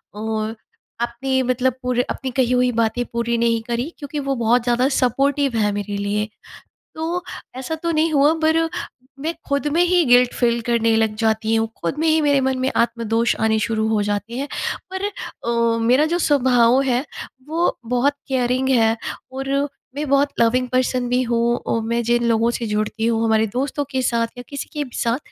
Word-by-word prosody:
औ 220 0 -2 0.5
आपने 260 +3 0
मतलब 255 +1 +1
पूरे 250 -1 +1
अपनी 265 - -3
कही 250 -1 +1
हुई 250 0 +3
बातें 230 +1 0
पूरी 235 0 0
नहीं 230 -1 +1
करी, 240 +5 -2
क्योंकि 290 0 -5
वो 275 -1 -1
बहुत 235 0 +2
ज़्यादा 245 +1 +2
सपोर्टिव 275 +1 +1
है 210 -1 +2
मेरे 205 0 -3
लिए। 205 +1 -1 0.7
तो, 335 +3 -2 0.3
ऐसा 265 +5 -4
तो 335 +1 -2
नहीं 320 0 +2
हुआ 290 +2 +5
पर 320 +1 +4 0.6
मैं 320 +4 -2
खुद 280 +1 0
में 335 - +3
ही 355 0 +3
गिल्ट 245 -1 +5
फील 235 -1 +1
करने 230 -1 +3
लग 220 -1 +1
जाती 220 0 +1
हूँ, 225 0 +1
खुद 170 - -2
में 325 - +1
ही 315 0 +4
मेरे 285 -2 +3
मन 265 0 0
में 260 +1 0
आत्मदोष 230 0 +1
आने 220 0 +2
शुरू 220 0 0
हो 220 -1 +1
जाते 205 +2 -3
हैं। 280 +2 -3 0.5
पर 380 +1 -2 0.4
अ, 235 -1 +1
मेरा 260 +5 +4
जो 340 +3 0
स्वभाव 255 -4 +4
है, 260 0 0 0.4
वो 330 +3 0
बहुत 250 +4 +1
केयरिंग 255 0 0
है 225 -3 +3 0.4
और 270 +1 -5 0.5
मैं 295 +1 -2
बहुत 280 +1 +3
लविंग 250 +2 +3
पर्सन 255 0 0
भी 250 +1 +2
हूँ 235 0 +1
और 230 - 0
मैं 235 +1 0
जिन 240 +1 +1
लोगों 230 +1 +2
से 240 - -3
जुड़ती 215 +1 -1
हूँ, 230 -1 +1
हमारे 220 -1 +3
दोस्तों 275 +3 -1
के 260 -2 0
साथ 235 -2 +1
या 245 - -7
किसी 280 -1 -5
के 300 -1 -2
भी 255 -4 -11
साथ, 235 +1 0
245 Hz, 190 wpm, -21 LUFS, 230-275 Hz, 0.7 s, हुआ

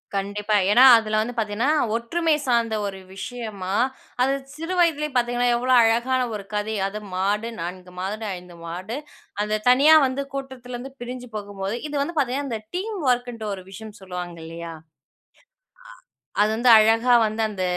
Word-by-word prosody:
கண்டிப்பா. 205 +2 -1 0.2
ஏன்னா, 245 +4 +7
அதுல 215 -1 0
வந்து 245 +3 -3
பாத்தீங்கன்னா, 225 +5 0 0.3
ஒற்றுமை 315 +7 +1
சார்ந்த 235 -3 +1
ஒரு 195 -1 -6 0.2
விஷயமா, 205 -4 -5 0.5
அது 270 +2 +3 0.2
சிறுவயதிலே 330 -2 +1
பாத்தீங்கன்னா, 245 0 +1
எவ்ளோ 255 +2 +1
அழகான 240 +3 +2
ஒரு 200 - -6
கதை 210 +1 -1
அது. 210 +2 -5 0.2
மாடு, 205 +4 0
4 180 +1 -7
மாடு, 210 +4 -4
5 180 -1 -13
மாடு, 185 +8 -5 0.5
அந்த 215 0 -1
தனியா 280 +5 +7
வந்து 260 +2 -2
கூட்டத்திலிருந்து 260 -1 -7
பிரிஞ்சு 250 0 -6
போகும்போது 200 0 -4
இது 295 - -5
வந்து 330 +4 -3
பாத்தீங்கன்னா, 275 +2 -1
அந்த 225 -2 -3 0.2
டீம் 415 +3 -3
வொர்க்ன்ட்டு 245 -3 0
ஒரு 185 -2 -8
விஷயம் 215 +2 -10
சொல்லுவாங்க 180 -2 -6
இல்லையா? 165 0 -7
ஆ - - -23 1.6
அது 210 - +2
வந்து 240 +1 +4
அழகா 225 +3 +4
வந்து, 215 +1 -3
அந்த 190 -3 -4
225 Hz, 150 wpm, -23 LUFS, 200-255 Hz, 1.6 s, ஏன்னா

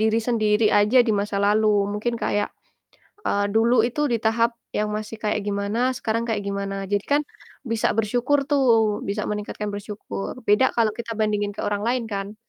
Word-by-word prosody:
diri 220 +1 +3
sendiri 215 -2 +2
aja 210 +5 +4
di 220 - +2
masa 200 0 -1
lalu 210 +2 +3 0.3
mungkin 235 +3 -2
kayak, 205 -2 -1 0.8
eee, 205 0 +1
dulu 230 +3 +4
itu 270 +5 -3
di 235 - +2
tahap 230 +1 +2 0.2
yang 210 0 0
masih 215 +1 -4
kayak 210 0 +1
gimana, 200 +3 -1 0.2
sekarang 230 -1 -1
kayak 210 -3 -1
gimana, 200 0 -3
jadi 205 - +3
kan 290 - +4 0.4
bisa 230 -3 0
bersyukur 245 +6 +1
tuh, 230 -7 +3
bisa 205 +1 -2
meningkatkan 210 0 -4
bersyukur. 205 -1 -6
Beda 210 +5 +5
kalau 225 -2 +3
kita 230 +1 -6
bandingin 210 -1 -1
ke - - -5
orang 205 0 -1
lain 245 0 +1
kan? 200 +1 -4
215 Hz, 175 wpm, -23 LUFS, 205-230 Hz, 0.8 s, Beda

